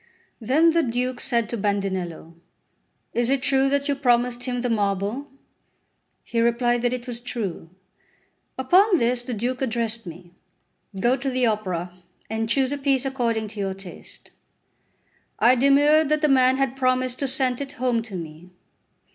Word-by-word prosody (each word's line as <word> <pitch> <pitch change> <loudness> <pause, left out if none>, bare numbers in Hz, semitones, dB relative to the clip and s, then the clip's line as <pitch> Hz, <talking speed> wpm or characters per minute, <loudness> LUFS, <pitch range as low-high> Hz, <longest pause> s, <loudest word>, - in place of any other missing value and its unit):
Then 285 +9 +3
the 335 +1 +3
Duke 250 -1 -2
said 235 -2 0
to 235 - -3
Bandinello: 190 -5 -2 0.8
"Is 240 0 0
it 270 -1 +1
true 270 0 +2
that 280 +1 0
you 285 - +2
promised 245 -2 +1
him 245 -1 -2
the 245 - -1
marble?" 205 +5 -1 0.9
He 230 - -1
replied 240 +1 +2
that 245 0 +1
it 250 -1 -4
was 240 -2 -6
true. 215 -9 -5 0.9
Upon 365 +9 +4
this 240 -2 +1
the 245 -1 -5
Duke 250 +5 -3
addressed 230 -4 -2
me: 175 +1 -10 0.7
"Go 240 +5 +3
to 270 +1 -3
the 255 -1 +1
Opera, 185 -6 -2 0.4
and 225 0 -2
choose 265 +2 +1
a 285 - -3
piece 275 -1 +1
according 230 -5 -1
to 210 - -10
your 195 -1 -2
taste." 195 -2 -12 1.1
I 245 - +5
demurred 285 +4 +4
that 305 0 +1
the 305 - +3
man 260 -2 +4
had 270 -1 0
promised 255 -1 0
to 275 - -1
sent 260 -1 -1
it 280 0 -6
home 250 -4 0
to 225 -4 -9
me. 165 0 -8
245 Hz, 165 wpm, -24 LUFS, 220-270 Hz, 1.1 s, I